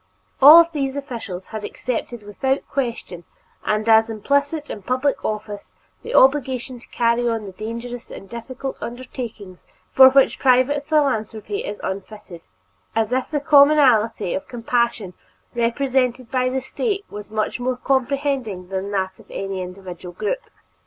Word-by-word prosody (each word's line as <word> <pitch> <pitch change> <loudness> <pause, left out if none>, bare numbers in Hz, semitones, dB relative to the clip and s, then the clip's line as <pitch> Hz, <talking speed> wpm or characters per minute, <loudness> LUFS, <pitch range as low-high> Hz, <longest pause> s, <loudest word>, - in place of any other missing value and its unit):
All 295 +5 +11
of 335 0 +6
these 275 -3 -2
officials 230 -10 -6
had 215 -1 -6
accepted 240 -2 -4
without 265 +7 -2
question 235 -9 -4 0.4
and 215 +1 -1
as 225 0 +5
implicit 280 +7 -1
in 205 - -7
public 255 +6 -1
office 210 - -5 0.3
the - - -5
obligation 260 -2 +3
to - - -18
carry 235 0 +1
on 225 -2 -2
the 195 - -7
dangerous 230 +4 -7
and 195 - -10
difficult 250 +4 -6
undertakings 235 -6 -7 0.3
for 260 0 +9
which 270 0 +3
private 270 +2 +3
philanthropy 275 - 0
is 205 - -6
unfitted, 190 -2 -7 0.5
as 225 0 +1
if 260 +1 -1
the 300 - -1
commonalty 280 - +4
of 190 - -4
compassion 235 -5 -1 0.4
represented 250 0 0
by 255 -1 +1
the 260 +1 -2
State 400 - -3
was 210 0 -8
more 245 +4 -2
comprehending 265 -8 -1
than 190 +1 -3
that 190 -2 -2
of - - -18
any 195 -1 -4
individual 180 -1 -8
group. - - -2
240 Hz, 140 wpm, -21 LUFS, 210-270 Hz, 0.5 s, All